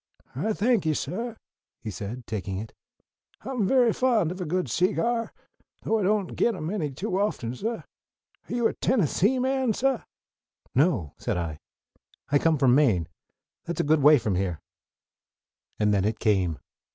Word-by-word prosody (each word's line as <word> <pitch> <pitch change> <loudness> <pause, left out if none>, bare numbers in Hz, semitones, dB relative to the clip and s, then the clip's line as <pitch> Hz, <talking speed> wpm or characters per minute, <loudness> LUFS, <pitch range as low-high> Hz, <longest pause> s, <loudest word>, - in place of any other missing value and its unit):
"I 220 - 0
thank 220 -5 +1
you, 155 - +2
suh," 225 - -3 0.4
he 110 - -6
said, 110 +5 -6
taking 95 -3 -4
it. 110 +3 -7 0.7
"I'm 250 -7 -1
very 245 -2 +4
fond 235 -10 +2
of 185 +1 -6
a - - -2
good 180 +3 -1
seegyar, 230 +5 0 0.5
though 225 - +1
I - - -1
don't 200 -1 0
git 235 - +2
'em 160 -1 -4
any 175 -8 -1
too 185 +8 -3
often, 135 - -1
suh. 225 - -4 0.7
Are - - -8
you 240 -2 +3
a - - -3
Tennessee 210 - +2
man, 260 -2 +1
suh?" 265 +2 0 0.7
"No," 130 - +2
said - - -2
I. 80 -3 -4 0.7
"I 145 - +5
come 160 0 +2
from 130 -3 +4
Maine. 110 - +3 0.6
That's 170 - -4
a - - -1
good 155 +1 +3
way 150 +2 +8
from 110 -5 -1
here." 90 -3 -1 1.2
And 105 -1 +2
then 100 -2 +2
it 110 +2 0
came. 95 -7 +1
165 Hz, 165 wpm, -26 LUFS, -, 1.2 s, way